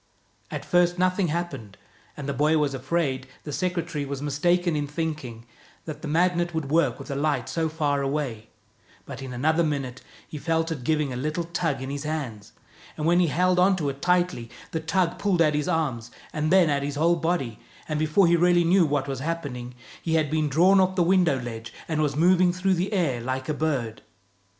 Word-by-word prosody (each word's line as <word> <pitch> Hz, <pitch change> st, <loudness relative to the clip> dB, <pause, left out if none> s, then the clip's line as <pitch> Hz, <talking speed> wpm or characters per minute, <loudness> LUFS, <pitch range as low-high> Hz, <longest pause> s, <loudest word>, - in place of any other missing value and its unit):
At -, -, -5 dB
first 175 Hz, -1 st, +3 dB
nothing 185 Hz, +1 st, +2 dB
happened, 150 Hz, -, -4 dB, 0.4 s
and 145 Hz, -2 st, -6 dB
the 140 Hz, -, -1 dB
boy 150 Hz, +4 st, +2 dB
was 145 Hz, -2 st, +1 dB
afraid 135 Hz, -1 st, -1 dB, 0.2 s
the 150 Hz, -, -6 dB
secretary 170 Hz, -3 st, -2 dB
was 140 Hz, -1 st, -4 dB
mistaken 170 Hz, +4 st, +1 dB
in 145 Hz, -1 st, -1 dB
thinking 145 Hz, -7 st, -4 dB, 0.4 s
that 155 Hz, -2 st, -7 dB
the 165 Hz, -, -5 dB
Magnet 175 Hz, +2 st, +1 dB
would 145 Hz, -3 st, -3 dB
work 165 Hz, +2 st, +2 dB
with -, -, -8 dB
a -, -, -2 dB
light 140 Hz, -4 st, 0 dB
so 160 Hz, +3 st, -1 dB
far 145 Hz, -3 st, 0 dB
away; 135 Hz, -6 st, -3 dB, 0.6 s
but -, -, -8 dB
in 135 Hz, -1 st, -6 dB
another 155 Hz, +7 st, +1 dB
minute 135 Hz, -5 st, -3 dB, 0.3 s
he 150 Hz, -, -7 dB
felt 165 Hz, +1 st, 0 dB
it 145 Hz, -6 st, -4 dB
giving 150 Hz, -1 st, 0 dB
a -, -, -4 dB
little 155 Hz, +6 st, -2 dB
tug 165 Hz, -5 st, -2 dB
in 135 Hz, -, -5 dB
his 140 Hz, 0 st, -4 dB
hands, 135 Hz, -10 st, -5 dB, 0.5 s
and 150 Hz, -, -2 dB
when 175 Hz, +2 st, +4 dB
he 180 Hz, -, +4 dB
held 180 Hz, +4 st, +2 dB
on 190 Hz, +2 st, +5 dB
to 155 Hz, -6 st, -1 dB
it 135 Hz, 0 st, -7 dB
tightly, 180 Hz, -9 st, +1 dB, 0.2 s
the 160 Hz, -, -1 dB
tug 170 Hz, +2 st, 0 dB
pulled 200 Hz, -3 st, +1 dB
at 155 Hz, -2 st, +4 dB
his 150 Hz, 0 st, -1 dB
arms 140 Hz, -10 st, -1 dB, 0.2 s
and 155 Hz, +1 st, -1 dB
then 185 Hz, -2 st, +6 dB
at 140 Hz, -2 st, +1 dB
his 145 Hz, 0 st, -3 dB
whole 170 Hz, +3 st, +3 dB
body, 160 Hz, -10 st, -1 dB, 0.3 s
and 155 Hz, -1 st, -2 dB
before 155 Hz, +5 st, +3 dB
he 170 Hz, 0 st, +4 dB
really 175 Hz, 0 st, +4 dB
knew 175 Hz, 0 st, +4 dB
what 145 Hz, -1 st, -1 dB
was 135 Hz, -2 st, -3 dB
happening, 135 Hz, -6 st, -4 dB, 0.3 s
he 165 Hz, -1 st, 0 dB
had 155 Hz, -2 st, +1 dB
been 155 Hz, -1 st, +1 dB
drawn 180 Hz, +7 st, +5 dB
off 185 Hz, 0 st, +2 dB
the 180 Hz, -, +3 dB
window 175 Hz, -6 st, +3 dB
ledge, 115 Hz, -1 st, -7 dB, 0.2 s
and 155 Hz, -2 st, 0 dB
was 145 Hz, -2 st, 0 dB
moving 180 Hz, +3 st, +4 dB
through 185 Hz, +2 st, +1 dB
the 185 Hz, +3 st, -1 dB
air 160 Hz, -, 0 dB
like 130 Hz, +2 st, -3 dB
a 155 Hz, -, 0 dB
bird. 135 Hz, -8 st, -2 dB
155 Hz, 205 wpm, -25 LUFS, 140-175 Hz, 0.6 s, then